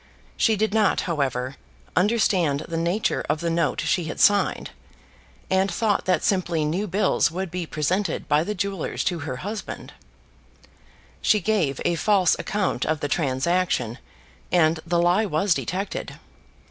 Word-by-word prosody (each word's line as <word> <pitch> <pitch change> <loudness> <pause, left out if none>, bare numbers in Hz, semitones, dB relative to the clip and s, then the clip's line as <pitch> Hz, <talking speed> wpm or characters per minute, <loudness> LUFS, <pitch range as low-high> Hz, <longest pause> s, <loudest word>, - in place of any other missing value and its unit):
She 220 - +3
did 215 0 0
not, 215 -3 +3
however, 135 -5 -2 0.4
understand 180 -7 +2
the 165 - -6
nature 170 +6 0
of 150 +1 +1
the 170 +1 -1
note 165 -2 0
she 165 +1 0
had 160 - -6
signed, 205 0 +3 0.8
and 190 +1 +2
thought 210 -2 0
that 185 - +1
simply 175 -5 +1
new 180 +8 -1
bills 195 -2 +2
would 180 +1 -4
be 180 -2 -4
presented 180 +8 -1
by 150 +1 +3
the 210 +4 -3
jewellers 195 -2 -2
to 175 -3 -1
her 140 -4 -4
husband. 210 +1 -6 1.3
She 210 - +3
gave 180 -9 0
a - - +2
false 185 +1 +3
account 205 -2 -1
of 155 0 0
the 145 - -1
transaction, 140 -4 0 0.5
and 160 -2 +3
the 170 0 +1
lie 180 +5 +3
was 180 +3 +2
detected. 190 +4 -4
175 Hz, 145 wpm, -24 LUFS, 155-200 Hz, 1.3 s, She